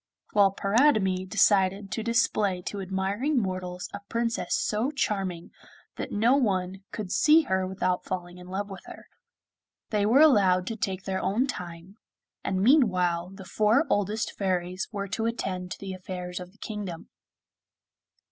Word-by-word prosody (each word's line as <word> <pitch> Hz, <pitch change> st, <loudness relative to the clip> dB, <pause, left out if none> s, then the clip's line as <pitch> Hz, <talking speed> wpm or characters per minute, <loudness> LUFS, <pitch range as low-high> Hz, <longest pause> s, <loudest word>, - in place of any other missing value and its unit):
While 200 Hz, -2 st, +5 dB
Paridamie 195 Hz, -5 st, +2 dB
decided 195 Hz, +1 st, +3 dB
to 225 Hz, -, -2 dB
display 215 Hz, -5 st, +1 dB
to 200 Hz, +1 st, -4 dB
admiring 195 Hz, +9 st, 0 dB
mortals 185 Hz, -3 st, -4 dB
a 200 Hz, -, -5 dB
Princess 230 Hz, 0 st, -1 dB
so 220 Hz, +5 st, 0 dB
charming 195 Hz, -, -2 dB, 0.5 s
that -, -, -5 dB
no 230 Hz, +5 st, +3 dB
one 190 Hz, -6 st, 0 dB
could 200 Hz, -4 st, -5 dB
see 310 Hz, +8 st, +5 dB
her 190 Hz, -7 st, 0 dB
without 185 Hz, -1 st, -1 dB
falling 180 Hz, -1 st, -5 dB
in 180 Hz, -, -12 dB
love 195 Hz, +2 st, -3 dB
with 195 Hz, -2 st, -9 dB
her. -, -, -11 dB, 0.9 s
They 210 Hz, -1 st, +2 dB
were 255 Hz, +7 st, +5 dB
allowed 195 Hz, -11 st, +5 dB
to 225 Hz, -, -3 dB
take 190 Hz, -3 st, -3 dB
their 190 Hz, -1 st, -2 dB
own 225 Hz, +7 st, +1 dB
time, 180 Hz, -5 st, -7 dB, 0.4 s
and 190 Hz, -1 st, -1 dB
meanwhile 185 Hz, -, +3 dB
the 195 Hz, 0 st, -11 dB
four 215 Hz, -, +2 dB
oldest 205 Hz, +2 st, 0 dB
fairies 185 Hz, -1 st, -2 dB
were 200 Hz, -2 st, -4 dB
to 225 Hz, +5 st, -1 dB
attend 185 Hz, -6 st, -3 dB
to -, -, -7 dB
the 195 Hz, -1 st, -6 dB
affairs 180 Hz, -1 st, -6 dB
of 180 Hz, 0 st, -9 dB
the 210 Hz, -, -26 dB
kingdom. 205 Hz, -6 st, -6 dB
195 Hz, 155 wpm, -27 LUFS, 185-215 Hz, 0.9 s, While